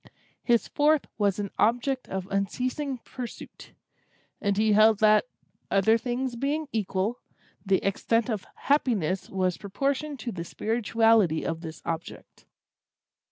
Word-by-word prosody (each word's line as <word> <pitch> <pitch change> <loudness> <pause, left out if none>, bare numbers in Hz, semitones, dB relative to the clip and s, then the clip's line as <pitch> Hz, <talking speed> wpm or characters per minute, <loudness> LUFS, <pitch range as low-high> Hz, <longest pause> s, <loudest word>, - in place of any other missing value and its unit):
His 235 -2 +2
fourth 300 0 +2
was 200 -2 +2
an 205 -2 -3
object 245 +3 +1
of 190 -1 -3
unceasing 255 - -1
pursuit; 245 -3 -9 0.7
and 200 -1 0
he 215 0 +3
held 215 +1 +6
that, 215 - +5 0.4
other 200 +3 +4
things 245 +2 -2
being 290 +5 -1
equal, 210 +1 -1 0.4
the 195 -2 +1
extent 230 +3 +1
of 215 -6 -3
happiness 205 - 0
was 185 -2 -1
proportioned 275 +8 -2
to 240 - -4
the 170 -4 -5
spirituality 225 -4 +2
of 165 0 -3
this 160 -2 -8
object. 165 0 -6
220 Hz, 125 wpm, -27 LUFS, 195-250 Hz, 0.7 s, held